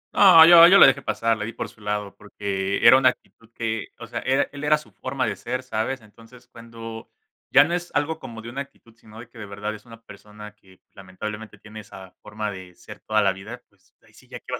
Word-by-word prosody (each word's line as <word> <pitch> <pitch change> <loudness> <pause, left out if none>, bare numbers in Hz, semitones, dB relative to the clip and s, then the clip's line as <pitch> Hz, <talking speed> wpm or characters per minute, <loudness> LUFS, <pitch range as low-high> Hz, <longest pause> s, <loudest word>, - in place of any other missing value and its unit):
No, 170 -5 +8
yo 170 0 +9
yo 190 +3 +6
la - - +9
dejé 135 +1 +3
pasar, 115 -4 -1
le 105 - -5
di 115 - -7
por - - -6
su 110 - -22
lado 105 -1 -4
porque 100 -1 -4
era 120 +3 +8
una 130 -1 +4
actitud 115 -2 -12
que 115 -2 -4
o - - -10
sea, - - -6
era 135 +2 0
él 145 0 -10
era 150 +1 +3
su 150 - -16
forma 130 0 -4
de 110 - -3
ser, 125 +1 -5
¿sabes? 130 +2 -4
Entonces, 115 +3 -19
cuando 115 -1 -11 0.4
ya - - +6
no 170 +3 -4
es 175 0 -4
algo 150 +2 -1
como 115 -5 -10
de 115 - -8
una 135 +3 -6
actitud, 140 -4 -15
sino 110 -1 -16
de 120 - -11
que 115 - -17
de 105 - -8
verdad 105 +2 -6
es 105 +1 -13
una 115 -1 -15
persona 105 0 -13
que 95 -3 -24
lamentablemente 105 +3 -9
tiene 105 +2 -12
esa 95 -3 -13
forma 105 0 -6
de 95 -2 -12
ser - - -14
toda 110 -1 0
la 95 -1 +2
vida, 110 +6 -11
pues 100 0 -35
ahí 110 - -25
sí 130 - -21
ya 125 -1 -9
qué - - -46
vas 125 - -3
115 Hz, 245 wpm, -23 LUFS, 105-130 Hz, 0.4 s, yo